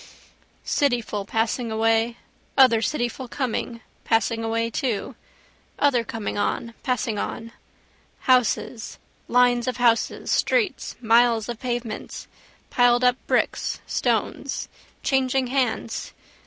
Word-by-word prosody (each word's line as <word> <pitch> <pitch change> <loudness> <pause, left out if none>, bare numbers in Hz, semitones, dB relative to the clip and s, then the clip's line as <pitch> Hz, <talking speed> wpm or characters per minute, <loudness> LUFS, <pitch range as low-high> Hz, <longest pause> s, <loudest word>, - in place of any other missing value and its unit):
Cityful 235 -7 0
passing 225 +2 -1
away, 225 +1 +1 0.4
other 250 -4 +6
cityful 240 -1 -2
coming, 240 -3 -3 0.2
passing 225 0 +1
away 230 +1 -1
too: 240 0 -2 0.6
other 265 -5 +3
coming 225 -4 -4
on, 230 +3 -1
passing 230 -4 -1
on. 230 +2 -5 0.7
Houses, 250 -2 +1 0.3
lines 245 0 +3
of 255 - -1
houses, 235 -2 +1
streets, 445 -7 +1
miles 230 -1 +4
of 235 -2 -5
pavements, 240 -3 -4 0.5
piledup 245 0 +4
bricks, - - 0
stones. - - -1 0.4
Changing 265 -1 +1
hands. 245 -4 -1
240 Hz, 100 wpm, -24 LUFS, 225-250 Hz, 0.7 s, other